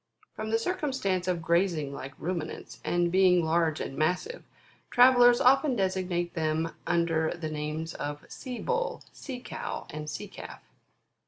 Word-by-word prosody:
From 220 0 -5
the 225 - +3
circumstance 230 - -1
of 175 -2 -1
grazing 170 -4 +1
like 135 -1 -7
Ruminants, 170 -2 -5
and 175 0 +1
being 180 -2 +4
large 160 -1 +1
and 135 - -4
massive, 180 - -1 0.5
travellers 245 -1 +7
often 270 +1 +4
designate 185 -3 -1
them 160 0 0 0.2
under 165 -2 +2
the 155 -2 -4
names 155 +2 -4
of 145 0 -5
Sea 250 -3 -7
utl, - - -1
Sea 260 -4 -7
cow, - - -6
and 150 0 -6
Sea - - -5
calf. - - -10
175 Hz, 145 wpm, -28 LUFS, 160-240 Hz, 0.5 s, travellers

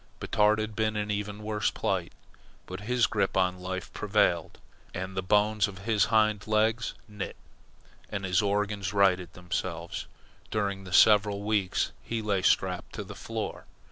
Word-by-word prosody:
Batard 105 +1 +3
had 110 0 -3
been 110 0 0
in 105 0 -1
even 105 0 -3
worse 105 -1 0
plight, - - -2 0.5
but 95 +1 -7
his 120 +3 +2
grip 100 -3 0
on 90 -1 +2
life 95 0 -5
prevailed, 100 -6 +1 0.4
and 95 +1 -4
the 95 - 0
bones 105 +2 +3
of 100 -2 -9
his 110 -3 +3
hind 110 -1 +2
legs 110 +2 +1
knit, 105 -2 -6 0.7
and 100 -2 -3
his 90 0 +2
organs 100 -1 -1
righted 95 -4 +3
themselves, 85 -1 -4 0.4
during 100 -2 -2
the 90 - -9
several 100 +1 +5
weeks 105 -3 0
he 115 - -3
lay 105 -3 0
strapped - - +1
to - - -4
the - - -9
floor. - - -5
105 Hz, 155 wpm, -28 LUFS, 95-105 Hz, 0.7 s, several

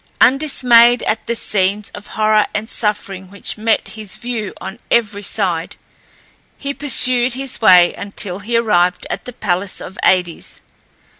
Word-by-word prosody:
Undismayed 245 -4 +4
at 220 - -2
the 235 - -1
scenes 200 -1 -1
of 205 - -10
horror 215 -1 +3
and 210 +1 -3
suffering 195 -4 -2
which 200 +1 -2
met 220 +1 0
his 215 -3 -8
view 235 -4 -5
on 210 - -8
every 210 -3 +1
side, 180 -5 -2 0.8
he 280 0 -5
pursued 255 -3 +2
his 265 -2 -3
way 180 -5 +6
until 200 -2 -3
he 230 +4 -1
arrived 180 -6 +1
at - - -5
the 250 - -8
palace 190 -2 -2
of 190 - -10
Aïdes. 180 -3 0
215 Hz, 145 wpm, -17 LUFS, 190-235 Hz, 0.8 s, way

